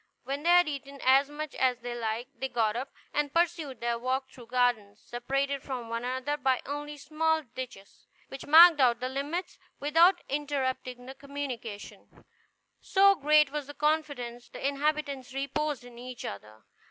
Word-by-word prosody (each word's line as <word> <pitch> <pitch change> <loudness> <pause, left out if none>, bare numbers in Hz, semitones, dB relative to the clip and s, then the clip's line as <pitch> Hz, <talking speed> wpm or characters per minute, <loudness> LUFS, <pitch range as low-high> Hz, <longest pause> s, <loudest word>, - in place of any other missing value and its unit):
When 275 +1 -4
they 335 - 0
had 355 -1 +6
eaten 280 -1 -6
as 270 +2 +5
much 300 0 -6
as 255 -2 +1
they 245 0 -5
liked, 235 +2 -4
they 265 +1 -2
got 225 -3 0
up, 260 +3 -3 0.2
and 295 -1 0
pursued 325 -6 0
their 235 0 -1
walk 260 +2 -1
through 240 -3 -13
gardens 235 -4 0
separated 275 +3 -2
from 250 -4 -6
one 230 +1 -3
another 260 +4 -2 0.2
only 290 +1 -5
by - - -11
small 315 +2 0
ditches, 245 -6 -10 0.2
which 270 - -9
marked 325 +1 +9
out 240 -3 +4
the 255 +1 -3
limits 290 +7 -4 0.2
without 335 +5 +4
interrupting 260 -3 -3
the 265 - -8
communication, 270 -6 -8 0.5
so 395 0 +5
great 300 -3 +4
was 295 -2 -4
the 290 - -9
confidence 285 -6 -1
the - - -3
inhabitants 280 -2 -2
reposed 280 0 -2
in 245 -1 -13
each 250 -1 -8
other. 105 +2 -9
275 Hz, 165 wpm, -29 LUFS, 245-295 Hz, 0.5 s, marked